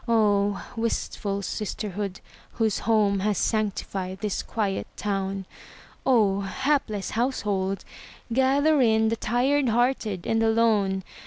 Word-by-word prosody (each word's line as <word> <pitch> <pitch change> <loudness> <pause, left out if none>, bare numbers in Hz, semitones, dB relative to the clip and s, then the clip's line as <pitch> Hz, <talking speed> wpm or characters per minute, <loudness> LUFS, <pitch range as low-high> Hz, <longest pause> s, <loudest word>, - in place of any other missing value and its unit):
Oh, 205 -3 +2
wistful 205 -3 -2
sisterhood, 200 -1 -4 0.3
whose 220 -3 0
home 205 -3 +3
Has 205 0 0
sanctified 195 -3 -1
this 210 -2 -1
quiet 205 -4 -2
town! 195 -1 -2 0.6
Oh, 210 -7 +4
hapless 215 0 -1
household, 205 -6 -1 0.5
gather 280 +4 +3
in 220 -2 +4
The 230 - 0
tired 255 +4 +1
hearted 230 -5 0
and 225 0 +1
the 225 - +3
lone! 210 -4 +2
215 Hz, 110 wpm, -26 LUFS, 195-230 Hz, 0.6 s, Oh